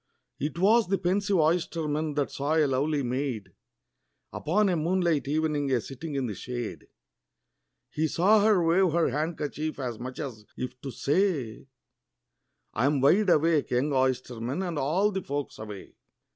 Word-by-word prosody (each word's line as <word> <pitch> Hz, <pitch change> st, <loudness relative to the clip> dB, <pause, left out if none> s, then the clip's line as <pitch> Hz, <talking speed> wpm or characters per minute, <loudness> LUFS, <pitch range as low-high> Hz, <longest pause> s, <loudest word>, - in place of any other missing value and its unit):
It 150 Hz, +4 st, -3 dB
was 215 Hz, +4 st, +4 dB
the 195 Hz, +1 st, +1 dB
pensive 195 Hz, +2 st, +1 dB
oysterman 155 Hz, -2 st, 0 dB
that 145 Hz, -2 st, -1 dB
saw 145 Hz, +3 st, -1 dB
a 155 Hz, -2 st, +4 dB
lovely 140 Hz, +2 st, 0 dB
maid, 125 Hz, -5 st, -3 dB, 0.8 s
Upon 205 Hz, +7 st, +1 dB
a 180 Hz, -, +1 dB
moonlight 170 Hz, -2 st, +1 dB
evening, 150 Hz, -1 st, 0 dB
a 125 Hz, -, +3 dB
sitting 140 Hz, +6 st, -7 dB
in 135 Hz, -2 st, 0 dB
the 110 Hz, -, -3 dB
shade; 120 Hz, +2 st, -6 dB, 1.0 s
He 160 Hz, +1 st, 0 dB
saw 200 Hz, +7 st, +4 dB
her 210 Hz, -5 st, +4 dB
wave 175 Hz, 0 st, +3 dB
her 170 Hz, -1 st, +2 dB
handkerchief, 155 Hz, +1 st, -3 dB
as 125 Hz, -5 st, -4 dB
much 130 Hz, +1 st, -7 dB
as 125 Hz, -8 st, -6 dB
if 125 Hz, 0 st, -6 dB
to 140 Hz, -, -5 dB
say, 140 Hz, -, -1 dB, 1.1 s
"I 125 Hz, -, +1 dB
'm 145 Hz, -1 st, +2 dB
wide 185 Hz, +10 st, +4 dB
awake, 160 Hz, -2 st, +3 dB
young 130 Hz, +4 st, +1 dB
oysterman, 130 Hz, +3 st, -1 dB
and 170 Hz, -5 st, -3 dB
all 175 Hz, +10 st, +2 dB
the 190 Hz, -1 st, -2 dB
folks 145 Hz, -3 st, -4 dB
away." 105 Hz, -2 st, -9 dB
150 Hz, 155 wpm, -27 LUFS, 130-170 Hz, 1.1 s, was